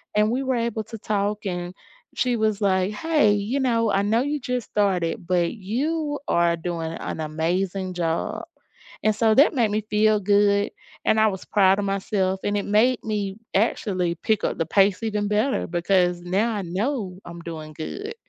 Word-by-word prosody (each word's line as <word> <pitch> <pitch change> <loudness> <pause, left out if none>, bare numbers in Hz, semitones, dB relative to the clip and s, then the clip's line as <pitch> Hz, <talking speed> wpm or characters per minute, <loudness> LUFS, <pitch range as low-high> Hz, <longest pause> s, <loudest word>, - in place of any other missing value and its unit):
and 210 0 +3
we 260 +2 -1
were 260 -1 0
able 230 -2 -1
to 225 +1 -8
talk, 205 0 -1
and 175 -1 -3 0.4
she 245 -2 +1
was 215 -1 0
like, 190 0 +1
"Hey, 295 -2 +2
you 205 +7 -1
know, 230 -4 +1
I 195 - +2
know 225 +3 +2
you 290 +2 -1
just 250 -2 -3
started, 180 -5 0
but 175 -2 +1
you 290 - -2
are 170 0 +3
doing 165 -1 -4
an 165 - -5
amazing 180 +5 -2
job," 165 -2 -2 0.6
and 215 0 +3
so 220 0 +3
that 285 +3 +6
made 230 -6 +2
me 215 +1 0
feel 215 0 +3
good, 205 +1 +3 0.3
and 220 - +3
I 220 - +5
was 190 -2 -5
proud 195 -1 +3
of 205 - -1
myself, 190 -1 -1
and 205 0 0
it 200 - -1
made 225 +5 +3
me 205 -3 -2 0.2
actually 185 -4 0
pick 215 +4 0
up - - -1
the 165 - 0
pace 195 +4 +3
even 210 -2 -1
better, 215 +6 +1
because 175 0 +1
now 195 +6 0
I 205 - -2
know 190 +1 -3
I'm 170 0 -9
doing 160 -2 -7
good. 400 - -6
205 Hz, 185 wpm, -24 LUFS, 180-220 Hz, 0.6 s, that